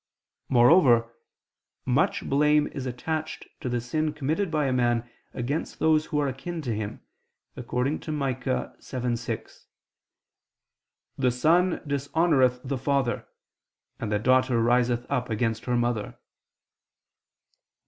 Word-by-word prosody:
Moreover 120 -3 +5 0.7
much - - +1
blame 150 +2 +3
is 135 -2 -5
attached 155 +6 -4
to 130 - -4
the 120 0 0
sin 155 +6 -1
committed 155 +6 -1
by 155 -2 0
a 130 - +1
man 120 -1 +1 0.2
against 135 +5 -3
those 155 -1 +2
who 150 - -2
are 145 -1 +1
akin 165 +6 -5
to 120 -4 -2
him, 105 -1 -5 0.5
according 125 +4 -2
to 155 - -6
Micah 130 -3 -2
7:6: 120 -2 -4 1.5
"the 130 -1 +3
son 165 +9 +2
dishonoreth 140 -2 +2
the 135 -1 -3
father, 130 -4 0 0.7
and 110 - -3
the 105 - +2
daughter 130 +2 +3
riseth 120 +1 +2
up 125 -3 -1
against 115 0 -1
her 125 -1 +1
mother." 120 -3 -1
130 Hz, 120 wpm, -26 LUFS, 120-150 Hz, 1.5 s, Moreover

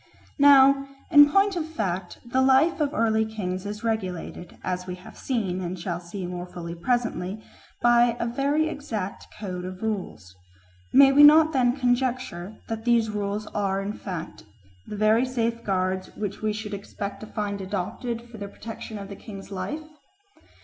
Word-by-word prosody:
Now 275 -1 +7 0.2
in 290 -1 +9
point 395 +4 +3
of 340 - -1
fact 190 - -3
the 255 +2 +1
life 270 +6 +4
of 295 - +2
the 300 - -7
early 220 -1 +3
kings 200 -3 -4
is 210 +2 -6
regulated, 185 -6 -3
as 180 0 -3
we 180 - -4
have 180 - -13
seen 195 -8 -2
and 180 +1 -4
shall 170 0 -3
see 180 +2 -6
more 175 0 -5
fully 170 -1 -7
presently, 210 0 -1 0.4
by 240 0 +5
a - - 0
very 280 +6 +1
exact 220 -11 -5
code 185 -4 -5
of 185 +2 -7
rules. 185 - -4 0.6
May 270 +1 +8
we 285 +2 +6
not 310 +2 +8
then 250 -1 +2
conjecture 245 -7 -1
that 225 0 -4
these 230 -2 +3
rules 205 0 -2
are 195 -1 0
in 200 +1 -3
fact 180 -6 -6 0.5
the 210 - -6
very 215 +3 +4
safeguards 220 -7 -1
which 205 -2 -4
we 215 0 +1
should 210 0 -5
expect 200 0 -6
to 215 - -9
find 205 -2 -3
adopted 205 +5 -3
for 230 -2 -11
the 200 - -5
protection 220 +1 -8
of 200 -1 -7
the 200 - -8
king's 195 -1 -10
life? 195 +11 -4
215 Hz, 170 wpm, -25 LUFS, 185-245 Hz, 0.6 s, in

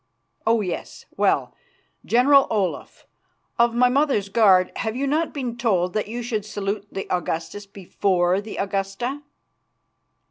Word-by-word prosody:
"Oh! 225 0 +3
yes. 180 -4 -6
Well, - - +1 0.5
General 270 +3 +4
Olaf, 200 -5 -3 0.5
of 235 0 +3
my 250 +1 +5
mother's 255 -6 +1
guard, 195 -4 +4
have 220 0 -2
you 270 +2 -1
not 310 +4 0
been 250 -5 -4
told 185 -7 +1
that 215 -1 -1
you 240 +3 -5
should 225 -3 -2
salute 205 0 -4
the 195 - -5
Augustus 175 +4 -4
before 185 -1 0
the 210 +1 -8
Augusta?" 195 +8 -3
215 Hz, 135 wpm, -23 LUFS, 195-245 Hz, 0.5 s, my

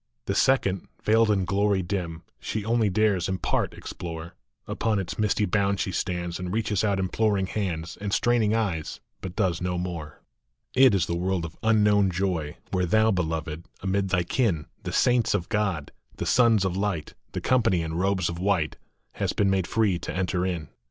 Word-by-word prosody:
The 100 - -1
second, 100 -5 +2 0.2
veiled 110 +1 +4
in 100 -3 +2
glory 100 0 +1
dim, 85 -3 -3 0.2
She 110 -2 -3
only 115 -2 +2
dares 100 -3 +2
in 95 - -1
part - - -1
explore; 85 -2 -7 0.3
Upon 110 -2 0
its 95 +1 -4
misty 105 0 +2
bound 100 0 +1
she 95 - -1
stands, 85 -2 -2
And 90 -1 -4
reaches 105 -1 0
out 100 -2 +2
imploring 95 +1 +1
hands 85 -5 -3
And 100 -1 -3
straining 115 -1 +2
eyes, 95 -9 -2 0.2
but 95 -1 -6
does 90 -5 0
no 90 0 -1
more. 85 -5 -5 0.5
THREE 130 - +5
WORLDS. - - +10
It 110 - +3
is 85 - +1
the 85 - -2
world 90 0 -1
of 85 - -9
unknown 105 -3 +4
joy, 90 -5 -2
Where 90 -1 +1
thou, 110 +4 +4
Beloved, 80 -3 -2
amid 95 0 0
thy 90 -1 +2
kin, 90 - 0 0.2
The - - -5
saints 120 -3 +3
of 90 -4 -2
God, 100 -8 -1 0.3
the - - -3
Sons 115 -5 +4
of 95 -1 -1
Light, 95 -5 -2 0.2
The - - -2
company 110 -9 +2
in 80 0 -4
robes 95 0 +1
of 85 0 -4
white, 90 -5 0 0.3
Hast - - -2
been 100 -1 +3
made 95 -3 +1
free 105 -5 +1
to - - -5
enter 90 -1 -1
in. 85 -5 -3
95 Hz, 190 wpm, -26 LUFS, 85-105 Hz, 0.5 s, WORLDS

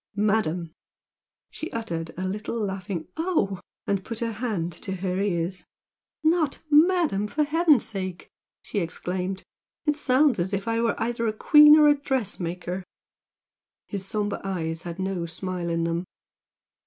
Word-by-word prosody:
"Madam 200 -6 +1 0.4
" - - -67
She 320 - -6
uttered 170 -8 -4
a 185 +1 -2
little 210 +4 -3
laughing 190 -4 -3
"Oh!" 315 - 0 0.3
and 200 -1 0
put 230 - -6
her 230 0 -2
hand 210 -7 -2
to 190 - -4
her 185 0 -2
ears. 180 -2 -1 0.6
"Not 315 -3 +2
'Madam' 310 - +4
for 300 +8 +1
heaven's 305 -3 +4
sake!" 190 -4 -5 0.4
she 210 - -2
exclaimed; 180 +2 -3 0.4
"It 300 -1 +2
sounds 275 -4 +3
as 185 +3 -1
if 195 +2 -2
I 230 0 +1
were 235 - 0
either 230 0 -1
a - - +2
queen 300 +6 +8
or 300 -1 +7
a 295 - +7
dressmaker!" 190 -10 -3 1.0
His 200 -2 -4
sombre 205 +1 -1
eyes 165 -4 -2
had 170 -1 -6
no 190 -3 -2
smile 180 +1 -4
in 165 0 0
them. 170 +2 -1
200 Hz, 150 wpm, -26 LUFS, 180-240 Hz, 1.0 s, queen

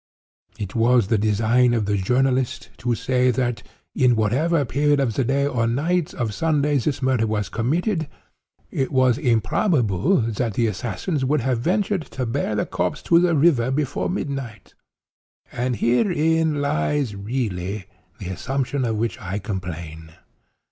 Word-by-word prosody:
It 100 -2 -5
was 115 -2 +3
the 110 -3 +2
design 115 +4 +3
of 110 -3 0
the 105 0 0
journalist 125 +5 0
to 120 -1 -1
say 125 +3 +1
that, 120 -1 -1 0.4
at 125 -1 +6
whatever 140 +8 +1
period 145 +4 +2
of 130 -5 +1
the 135 - 0
day 135 +3 +1
or 125 -5 0
night 155 +7 0
of 115 -4 -2
Sunday 150 0 +1
this 135 +1 -2
murder 130 -4 +2
was 105 -4 -2
committed, 160 - -1 0.6
it 135 - -1
was 130 -1 +3
improbable 125 - +2
that 115 -1 -2
the 120 - +2
assassins 120 - -2
would 145 +2 +1
have 125 -1 0
ventured 195 - 0 0.2
to 130 - 0
bear 115 -2 -1
the 105 - 0
corpse 90 0 -2
to 170 - +5
the 175 -1 +2
river 140 -6 +3
before 135 0 -1
midnight. 135 - -5 0.8
And 125 +1 -1
herein 160 - +1
lies, 120 - 0
really, 100 -3 -3 0.3
the - - -7
assumption 135 +6 -2
of 110 -2 -1
which 115 +3 -2
I 95 0 -4
complain. 85 -5 -6
125 Hz, 150 wpm, -22 LUFS, 110-145 Hz, 0.8 s, at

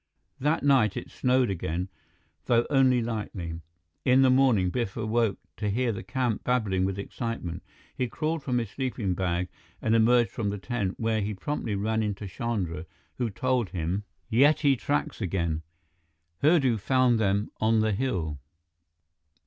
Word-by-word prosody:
That 150 +3 +1
night 130 -8 +4
it - - -6
snowed 125 -3 +2
again, 90 0 -2 0.6
though 120 0 +3
only 130 -3 +4
lightly. 95 -7 -4 0.4
In 130 +1 +5
the 130 - +5
morning, 125 -9 +4
Biff 120 -3 -2
awoke 110 -2 +1 0.2
to 105 -1 -1
hear 120 +4 +1
the 100 - -5
camp 125 -5 -1
babbling 105 -7 +1
with 95 0 -2
excitement. 100 -4 -4 0.3
He 125 - -1
crawled 155 +5 -2
from 125 -3 -1
his 115 -4 -2
sleeping 125 -8 -2
bag 90 -1 -1 0.3
and 110 - +1
emerged 120 +1 +4
from 105 -3 -2
the 100 - -3
tent, 100 -2 -3
where 110 -1 +1
he 105 +1 -2
promptly 110 0 -3
ran 110 +3 0
into 105 -1 -3
Chandra, 90 -5 -3 0.3
who 120 -2 0
told 125 0 0
him: 90 +3 -2 0.3
"Yeti 145 +3 +5
tracks 140 +1 -2
again. 85 -4 -1 0.8
Hurdu 140 -6 +4
found 125 +1 +3
them 100 0 +1
on 110 0 +3
the 110 0 +2
hill." 90 - -1
110 Hz, 150 wpm, -27 LUFS, 95-125 Hz, 0.8 s, In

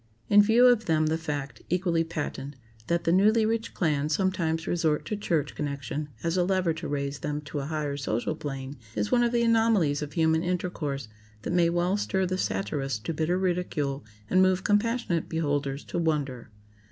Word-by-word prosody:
In 205 0 +8
view 225 +4 +5
of 240 -3 +5
them 155 -1 +2
the 155 +1 +1
fact, 145 -3 -4
equally 175 -2 +1
patent, 150 -3 -5 0.3
that 170 0 +1
the 165 - +2
Newlyrich 220 +4 +2
clan 150 -4 +1
sometimes 165 -2 0
resort 160 -3 0
to 215 - -2
church 165 -8 -1
connection 145 0 -4
as 165 +2 0
a 180 - +3
lever 185 -2 +1
to 165 +1 -6
raise 140 -1 -3
them 150 0 -3
to 145 0 -5
a 135 - -3
higher 150 -2 -2
social 135 +2 -2
plane, 135 -2 -6 0.2
is 105 -1 -1
one 240 - +4
of 240 -1 +2
the 240 -1 +2
anomalies 225 -11 +3
of 145 -1 -5
human 160 0 +2
intercourse 170 -7 -2 0.4
that - - -2
may 175 -1 +4
well 175 +3 +1
stir 190 -2 0
the 185 +1 -2
satirist 110 - -2
to 165 - -1
bitter 160 +3 0
ridicule 175 -7 -1 0.2
and 185 +10 +4
move 185 0 +3
compassionate 210 -4 +1
beholders 145 -3 -1
to - - -4
wonder. 145 -8 -1
165 Hz, 180 wpm, -27 LUFS, 145-185 Hz, 0.4 s, In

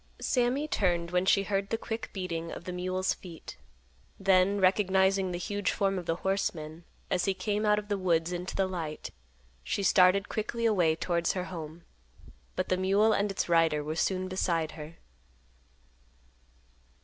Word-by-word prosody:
Sammy 255 +4 +1
turned 175 - 0
when 180 +1 +1
she 195 - +4
heard 195 0 -1
the 225 - 0
quick 225 0 -5
beating 170 -4 -4
of - - -7
the 180 - -5
mule's 185 +1 -1
feet; 170 -3 -11 0.6
then, 195 +1 +3
recognizing 190 0 +3
the 175 - -3
huge 205 +2 -2
form 195 -2 0
of 175 - -9
the 165 - +1
horseman, 170 -4 -2 0.3
as 180 - +1
he 195 -1 +1
came 210 +1 -1
out 210 0 +4
of 210 0 -4
the 205 -1 -1
woods 170 -2 +1
into 180 +1 -4
the 195 - +2
light, 165 -5 -5 0.5
she 200 - -2
started 190 +1 +5
quickly 230 +2 -3
away 180 -8 +3
towards 170 0 0
her 185 - -2
home; 160 0 -7 0.7
but - - -2
the 185 - +2
mule 200 +4 +3
and 205 +1 +1
its 195 - -2
rider 165 -3 +3
were 155 +1 -4
soon 185 +2 0
beside 170 -4 -1
her. 155 +1 -9
185 Hz, 165 wpm, -29 LUFS, 170-200 Hz, 0.7 s, started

